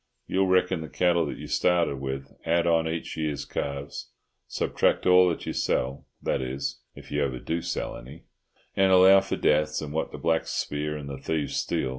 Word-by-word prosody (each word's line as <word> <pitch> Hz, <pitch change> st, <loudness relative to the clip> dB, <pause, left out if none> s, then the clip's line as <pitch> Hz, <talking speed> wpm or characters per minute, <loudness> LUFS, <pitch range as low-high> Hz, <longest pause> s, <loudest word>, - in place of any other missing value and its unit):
You'll 95 Hz, 0 st, +1 dB
reckon 95 Hz, -1 st, +2 dB
the 80 Hz, -, -7 dB
cattle 85 Hz, +2 st, +2 dB
that -, -, -5 dB
you -, -, -8 dB
started 85 Hz, -5 st, +1 dB
with, 65 Hz, 0 st, -5 dB
add 85 Hz, +1 st, +2 dB
on 85 Hz, -1 st, +3 dB
each 80 Hz, +1 st, -4 dB
year's 75 Hz, -2 st, -2 dB
calves, 70 Hz, 0 st, -5 dB, 0.4 s
subtract -, -, 0 dB
all 90 Hz, 0 st, +6 dB
that 85 Hz, -, -4 dB
you -, -, -3 dB
sell,—that 65 Hz, +1 st, -2 dB
is, 65 Hz, 0 st, -4 dB, 0.2 s
if -, -, -13 dB
you 75 Hz, 0 st, +1 dB
ever 65 Hz, -3 st, -2 dB
do 80 Hz, +6 st, -3 dB
sell -, -, -3 dB
any—and 80 Hz, +7 st, -4 dB
allow 95 Hz, +1 st, +7 dB
for 95 Hz, -, -3 dB
deaths, 75 Hz, 0 st, +2 dB
and 75 Hz, -1 st, -6 dB
what 80 Hz, -, -2 dB
the -, -, -7 dB
blacks 80 Hz, -1 st, 0 dB
spear 75 Hz, +1 st, -2 dB
and 70 Hz, -1 st, -7 dB
the 70 Hz, -1 st, -6 dB
thieves 75 Hz, +1 st, -2 dB
steal. 65 Hz, -, -1 dB
80 Hz, 185 wpm, -26 LUFS, 70-85 Hz, 0.4 s, allow